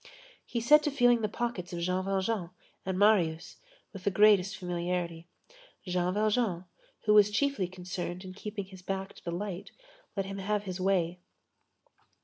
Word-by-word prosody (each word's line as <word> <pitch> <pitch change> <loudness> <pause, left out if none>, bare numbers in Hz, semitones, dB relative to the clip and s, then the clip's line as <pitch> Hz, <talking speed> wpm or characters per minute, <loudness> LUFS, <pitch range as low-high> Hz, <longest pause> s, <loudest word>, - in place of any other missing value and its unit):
He 235 - -3
set 300 +6 +7
to 300 - 0
feeling 245 -4 +4
the 215 - 0
pockets 200 -6 -3
of 170 - -3
Jean 180 +2 0
Valjean 195 -1 -1 0.4
and 190 -1 -1
Marius, 180 -6 +2 0.4
with 195 -2 -9
the - - +2
greatest 195 -1 +4
familiarity. 175 -1 -3 0.6
Jean 180 0 0
Valjean, 210 -4 +1 0.4
who 210 - +5
was 210 -1 +7
chiefly 220 -3 0
concerned 180 0 -6
in 185 - -8
keeping 205 0 -5
his 190 -1 -13
back 195 +1 -4
to - - -17
the 175 - -4
light, 180 +1 -4 0.5
let 195 - 0
him 195 0 -6
have 205 +1 -1
his 185 -2 -5
way. 180 -2 +1
190 Hz, 160 wpm, -30 LUFS, 180-210 Hz, 0.6 s, set